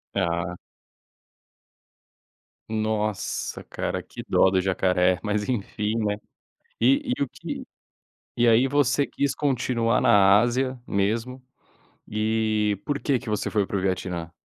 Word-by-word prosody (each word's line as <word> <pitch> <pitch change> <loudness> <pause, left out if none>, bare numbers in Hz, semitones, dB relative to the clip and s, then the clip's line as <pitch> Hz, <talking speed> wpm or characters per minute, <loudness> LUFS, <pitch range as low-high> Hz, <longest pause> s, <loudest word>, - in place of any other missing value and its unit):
Ah. 85 -2 -1 2.1
Nossa, 110 -2 -2
cara. - - -3
Que - - -10
dó 95 - +4
do 95 -1 +2
jacaré. 90 -1 +2
Mas, 105 0 -1
enfim, 105 -2 -2
né. 105 -2 0 0.6
E 275 -2 +3
e - - +1
o - - -2
que - - -7 0.7
E 120 0 +4
aí 115 +3 +5
você 145 0 +2
quis 140 0 -1
continuar 125 -4 +1
na 100 0 +6
Ásia 130 +2 0
mesmo. 115 +6 -1 0.6
E 110 -1 0
por 145 -1 -1
que 140 -2 +1
que 120 - -8
você 105 - -1
foi 105 -2 +1
para 100 - -3
o - - -1
Vietnã? 90 -3 -3
110 Hz, 130 wpm, -25 LUFS, 100-125 Hz, 2.1 s, na